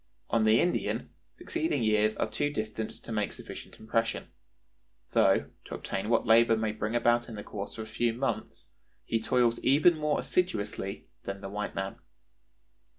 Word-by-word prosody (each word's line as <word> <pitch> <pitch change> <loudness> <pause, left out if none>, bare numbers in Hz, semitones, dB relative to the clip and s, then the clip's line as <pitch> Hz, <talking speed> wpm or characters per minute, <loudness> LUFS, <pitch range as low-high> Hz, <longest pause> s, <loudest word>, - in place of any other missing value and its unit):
On 115 -2 +3
the 110 +2 +6
Indian, 180 - 0 0.3
succeeding 320 - -1
years 110 0 +3
are - - +1
too 145 - -1
distant 110 -4 -3
to - - -8
make 105 -2 0
sufficient - - -9
impression; 115 +1 -1 0.8
though, - - +3
to - - -6
obtain 95 +3 -3
what 115 - +3
labor 115 0 +6
may 110 -1 0
bring 110 +1 -3
about 120 0 +3
in 115 - -7
the 105 - -6
course 100 +1 -6
of 110 - -4
a - - -14
few 120 +1 +1
months, 130 +4 -3 0.3
he 115 - 0
toils 120 0 +2
even 150 +6 +5
more 150 -1 0
assiduously 105 - -1 0.2
than 100 0 -5
the 95 - -6
white 105 0 -3
man." 95 0 -3
115 Hz, 165 wpm, -30 LUFS, 105-120 Hz, 0.8 s, the